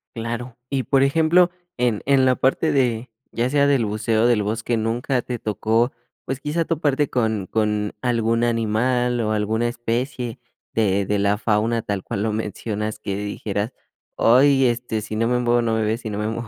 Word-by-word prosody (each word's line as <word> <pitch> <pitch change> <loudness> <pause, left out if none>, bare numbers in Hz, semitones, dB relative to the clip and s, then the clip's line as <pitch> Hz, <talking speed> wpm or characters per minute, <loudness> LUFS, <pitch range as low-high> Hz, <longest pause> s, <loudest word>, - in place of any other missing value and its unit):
Claro, 115 +1 -5
y 135 -2 0
por 135 +4 +3
ejemplo, 165 +5 +4 0.3
en 120 -4 +1
en 135 -2 +4
la 130 0 +4
parte 135 +5 +1
de, 125 -4 0 0.2
ya 120 +1 0
sea 140 -1 +3
del 135 -5 +3
buceo 110 +1 0
o - - +4
del 120 -3 +3
bosque, 115 +3 -1
¿nunca 120 +3 -1
te 125 -1 -4
tocó, 110 +3 0 0.3
pues 135 +1 -3
quizá 155 +4 -1
toparte 150 -3 0
con 110 -5 0
con 105 0 -1
algún 115 -2 +1
animal 120 +2 +1
o 110 -1 -1
alguna 110 +2 0
especie 120 +1 -3 0.3
de 100 -3 +1
de 105 +1 0
la 100 +1 +2
fauna, 110 +1 0
tal 100 -2 -3
cual 100 - -3
lo 110 -1 -1
mencionas, 105 0 -3
que 100 -2 -4
dijeras: 105 +1 -3 0.5
"Ay, 135 +3 +5
este, 120 -2 -1
si 110 +1 -6
no 115 +1 +1
me 125 +1 +2
muevo 120 0 +2
no 115 -1 0
me 110 - 0
ve, 110 +1 0
si 115 - -6
no 105 - -4
me 105 0 -1
muevo 115 +1 -4
115 Hz, 190 wpm, -22 LUFS, 110-125 Hz, 0.5 s, Ay